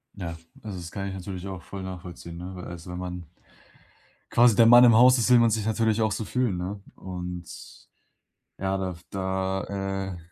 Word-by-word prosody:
Ja, 85 -4 -6 0.3
also, 105 -4 -6
das 85 -1 -8
kann 100 -1 -4
ich - - -6
natürlich 95 0 -6
auch 95 -2 -6
voll 95 +2 -8
nachvollziehen, 90 -2 -8
ne? 90 +1 -7
Also, 85 0 -8
wenn 90 - -5
man 90 -1 -6 1.0
quasi 120 -3 +5
der 115 - +6
Mann 120 +2 +9
im 120 -2 +7
Haus 125 +3 +7
ist, 120 +1 +1
will 125 - +7
man 115 -1 +5
sich 110 -1 -1
natürlich 110 0 +1
auch 110 -1 +2
so 110 +2 -3
fühlen, 120 -5 0
ne? 95 +3 -5
Und, 90 -1 -6 1.1
ja, 95 0 -1
da 95 -1 -2
f 85 0 -12
da, 95 0 -2 0.5
äh - - -10
95 Hz, 190 wpm, -26 LUFS, 90-110 Hz, 1.1 s, Mann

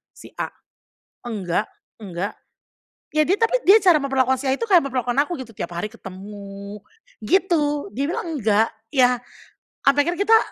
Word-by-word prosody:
si - - -13
A?" - - 0 0.8
"enggak 205 -4 -2 0.3
enggak" 195 -1 -4 0.8
ya 310 - +5
dia 380 +7 +1
tapi 485 +2 +2
dia 405 +4 +7
cara 360 -6 +5
memperlakukan 265 -1 +2
si - - -7
A 265 - +2
itu 460 +11 -3
kayak 360 -4 +5
memperlakukan 245 -2 -1
aku 340 -2 -6
gitu, 230 -5 -9
tiap - - -5
hari 175 +5 -3
ketemu, 200 0 -10 0.4
gitu. 300 - +1
Dia 275 +2 0
bilang 330 -3 -3
nggak, 220 0 +3 0.2
ya, 250 -3 +3 0.6
sampe 275 +1 +4
akhirnya 345 - -1
kita, 450 +2 +6
260 Hz, 160 wpm, -22 LUFS, 210-330 Hz, 0.8 s, dia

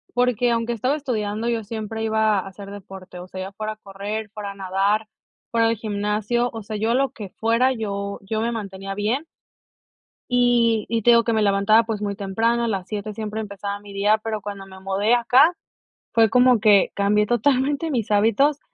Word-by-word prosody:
porque, 245 -1 +2
aunque 230 0 0
estaba 255 +6 0
estudiando, 225 -5 -2
yo 230 -2 -1
siempre 220 +1 -5
iba 220 -2 +2
a 195 - -6
hacer 200 +1 -10
deporte, 190 -2 -10
o 180 - -9
sea, 185 0 -7
ya 190 +1 -6
fuera 215 +1 -4
correr, 205 +1 -6
fuera 200 -2 -6
nadar, 195 +3 0 0.4
fuera 230 -1 +3
el 230 - 0
gimnasio, 210 +3 -1
o 225 -2 -7
sea, 215 0 -5
yo 220 +2 0
a 240 - +2
lo 270 -1 +1
que 205 -4 -8
fuera, 230 +4 +2
yo 200 -3 -4
yo 215 +2 -3
me 235 +1 0
mantenía 195 -3 -6
bien. 225 +9 -1 1.1
Y 240 -3 +3
y 230 0 0
te 240 - +5
digo 235 0 +6
que 230 0 0
me 220 - +2
levantaba 205 +2 +4
pues 220 -2 -4
muy 200 -1 -2
temprano, 225 +4 0
a - - 0
las 195 -4 -2
7 210 0 -4
siempre 215 0 -4
empezaba 200 -1 -5
mi 205 -1 -12
día, 205 +2 +3
pero 220 -2 -3
cuando 200 -1 -7
me 190 0 -13
mudé 195 +4 +1
acá, 255 +7 +5 0.6
fue 225 -3 +5
como 250 0 +5
que 205 -2 +4
cambié 205 +1 +2
totalmente 270 +7 +1
mis 230 -5 -2
hábitos 230 +8 +3
215 Hz, 195 wpm, -22 LUFS, 200-230 Hz, 1.1 s, digo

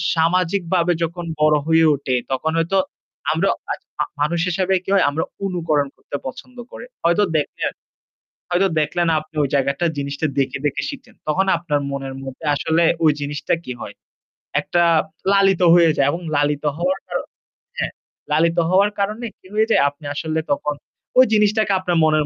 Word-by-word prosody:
সামাজিকভাবে 175 +1 +2
যখন 170 +1 -3 0.2
বড় 155 0 +5
হয়ে 165 0 +5
উঠি 135 -2 -1 0.2
তখন 155 +5 0
হয়তো 170 +4 +1 0.5
আমরা - - +1 0.2
আ - - +2 0.3
অ - - +4 0.2
মানুষ 165 +3 +1
হিসেবে 185 +2 0
কি - - -7
হয় 190 - +4
আমরা 155 +3 -1 0.2
অনুকরণ 160 -6 0
করতে - - -8
পছন্দ 250 - -9
করি। - - -9 0.2
হয়তো 170 +5 +3
দেখলেন, 150 - -2 0.8
হয়তো 180 +2 +3
দেখলেন 170 +3 0
আপনি 155 +1 -16
ওই 135 - -1
জায়গাটা 140 +4 +1
জিনিসটা 140 +2 -3
দেখে, 135 -1 0
দেখে 145 - 0
শিখেন। 280 - -10
তখন 190 +6 +2
আপনার 150 -4 -1
মনের 135 -1 -5
মধ্যে 135 +4 -8
আসলে 160 +3 +1 0.2
ওই 155 - +6
জিনিসটা 145 0 -2
কি 125 - -5
হয়? - - -7 0.7
একটা 175 0 +1 0.5
লালিত 195 -2 +4
হয়ে 170 -2 +6
যায় 140 0 +3
এবং 170 - -4 0.2
লালিত 145 0 0
হওয়ার 185 +3 0
কার 175 -1 -4 0.6
হ্যাঁ। - - -1 0.4
লালিত 165 +3 +2
হওয়ার 195 +3 +4
কারনে 215 +4 -1
কি - - -18
হয়ে 220 +1 +2
যায়? - - +5
আপনি 145 +1 -17
আসলে 160 +1 -1
তখন 150 +1 -2 0.4
ওই 260 - +9
জিনিসটাকে 210 -1 +3
আপনার 175 -2 0
মনের 155 -1 +3
165 Hz, 165 wpm, -21 LUFS, 145-185 Hz, 0.8 s, ওই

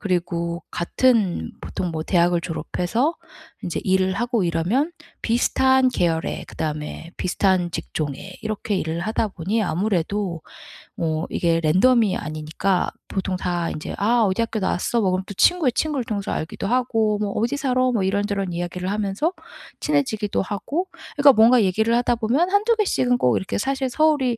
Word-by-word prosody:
그리고 170 -3 -2
같은 190 - +1
보통 180 - -4
뭐 160 -1 -3
대학을 175 -1 +2
졸업해서 180 - -1 0.5
인제 175 - -3
일을 190 0 +2
하고 240 -2 0
이러면 185 - 0 0.3
비슷한 260 +2 +3
계열에 170 -8 -1
그다음에 155 +2 -5
비슷한 185 -1 +1
직종에 160 +2 -5
이렇게 215 -1 -2
일을 165 -1 -2
하다 220 +3 -1
보니 195 +5 -2
아무래도 190 -1 -1 0.6
뭐 160 -1 -1
이게 165 -1 +1
랜덤이 200 +6 +3
아니니까 155 +5 -1 0.2
보통 190 -1 -2
다 175 -2 -1
인제 155 - -5
"아 230 +3 +3
어디 190 +2 +1
학교 225 -1 -1
나왔어." 195 +5 0
뭐 190 -2 +2
그럼 185 +1 -1
또 200 - -8
친구의 300 - +3
친구를 295 -3 -1
통해서 200 -3 -3
알기도 160 +4 -3
하고 225 -3 +1
뭐 205 -1 -1
"어디 230 +7 0
살아?" 255 -3 +1
뭐 220 -5 0
이런저런 200 -1 -1
이야기를 175 +2 -3
하면서 210 - -1 0.5
친해지기도 260 -9 0
하고. 280 - -3 0.3
그러니까 285 -1 +7
뭔가 230 +2 +6
얘기를 220 +5 +2
하다보면 240 +7 +1
1-2 430 +3 +3
개씩은 255 - +1
꼭 125 - +2
이렇게 190 - -3
사실 265 +3 -1
서울이 280 -5 +2
200 Hz, 350 characters per minute, -22 LUFS, 175-245 Hz, 0.6 s, 그러니까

